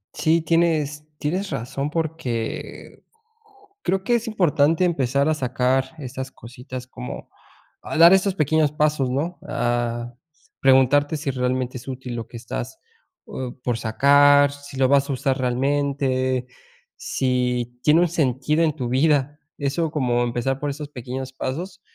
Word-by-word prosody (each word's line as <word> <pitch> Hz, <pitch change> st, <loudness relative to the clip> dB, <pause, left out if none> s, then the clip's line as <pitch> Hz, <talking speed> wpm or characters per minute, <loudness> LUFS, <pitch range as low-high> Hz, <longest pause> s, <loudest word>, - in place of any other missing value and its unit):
Sí, 165 Hz, +1 st, +2 dB
tienes 155 Hz, -2 st, +1 dB
tienes 180 Hz, +7 st, -2 dB
razón, 135 Hz, +4 st, -3 dB
porque 155 Hz, -8 st, -4 dB, 0.8 s
creo 190 Hz, 0 st, 0 dB
que 240 Hz, +4 st, +2 dB
es 235 Hz, 0 st, -2 dB
importante 165 Hz, -5 st, +2 dB
empezar 140 Hz, -3 st, +1 dB
a -, -, +3 dB
sacar 130 Hz, -1 st, +1 dB
estas 130 Hz, -1 st, -6 dB
cositas, 125 Hz, +1 st, -9 dB
como 60 Hz, -, -8 dB, 0.5 s
a -, -, -4 dB
dar 170 Hz, +2 st, +9 dB
estos 190 Hz, 0 st, +3 dB
pequeños 155 Hz, -2 st, +2 dB
pasos, 150 Hz, -3 st, +1 dB
¿no?, 155 Hz, +8 st, -2 dB
a 120 Hz, -4 st, -1 dB, 0.5 s
preguntarte 135 Hz, +3 st, +4 dB
si 145 Hz, -1 st, -2 dB
realmente 130 Hz, 0 st, -1 dB
es 120 Hz, -, -12 dB
útil 130 Hz, -2 st, -6 dB
lo 115 Hz, -2 st, -5 dB
que -, -, -13 dB
estás -, -, -6 dB, 0.5 s
o 125 Hz, -2 st, -6 dB
por 120 Hz, -2 st, 0 dB
sacar 145 Hz, +5 st, +5 dB
si 145 Hz, -1 st, -11 dB
lo 130 Hz, -1 st, +3 dB
vas 140 Hz, 0 st, +3 dB
a -, -, 0 dB
usar 135 Hz, 0 st, 0 dB
realmente, 130 Hz, 0 st, 0 dB, 0.5 s
si 125 Hz, -2 st, -1 dB
tiene 155 Hz, +3 st, +5 dB
un 175 Hz, -, +4 dB
sentido 150 Hz, 0 st, +1 dB
en 155 Hz, -2 st, +2 dB
tu 125 Hz, -6 st, -3 dB
vida, 145 Hz, +2 st, +2 dB, 0.2 s
eso 150 Hz, +3 st, -1 dB
como 125 Hz, -5 st, +1 dB
empezar 120 Hz, +3 st, -1 dB
por 145 Hz, -, -2 dB
esos 145 Hz, +1 st, -6 dB
pequeños 130 Hz, 0 st, -6 dB
pasos. 175 Hz, +9 st, -5 dB
140 Hz, 145 wpm, -23 LUFS, 125-150 Hz, 0.8 s, dar